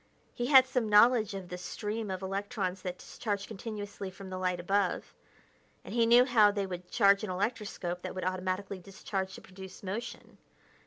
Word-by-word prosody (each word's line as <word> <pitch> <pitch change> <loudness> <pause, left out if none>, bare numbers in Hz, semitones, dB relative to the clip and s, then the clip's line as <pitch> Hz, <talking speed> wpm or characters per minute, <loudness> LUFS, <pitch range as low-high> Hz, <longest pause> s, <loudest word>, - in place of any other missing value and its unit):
He 240 - -2
had 265 -2 +8
some 250 -4 -1
knowledge 215 -1 +5
of 185 -2 -7
the 180 - -6
stream 210 +3 -4
of 190 0 -4
electrons 195 -1 -3
that 180 -1 -4
discharged 200 -1 -4
continuously 205 -2 -6
from 190 0 -10
the 185 - -4
light 180 -1 0
above, 195 +2 0 0.7
and - - -7
he 230 -1 +3
knew 240 +2 +7
how 225 -5 +6
they 200 -1 -1
could 180 -1 -7
charge 200 -2 +4
an 215 - -3
electroscope 190 -3 -3
that 185 0 -6
would 185 - -4
automatically 185 +1 -2
discharge 190 0 -4
to - - -10
produce 190 +1 -11
motion. 200 +5 -6
195 Hz, 175 wpm, -31 LUFS, 185-215 Hz, 0.7 s, had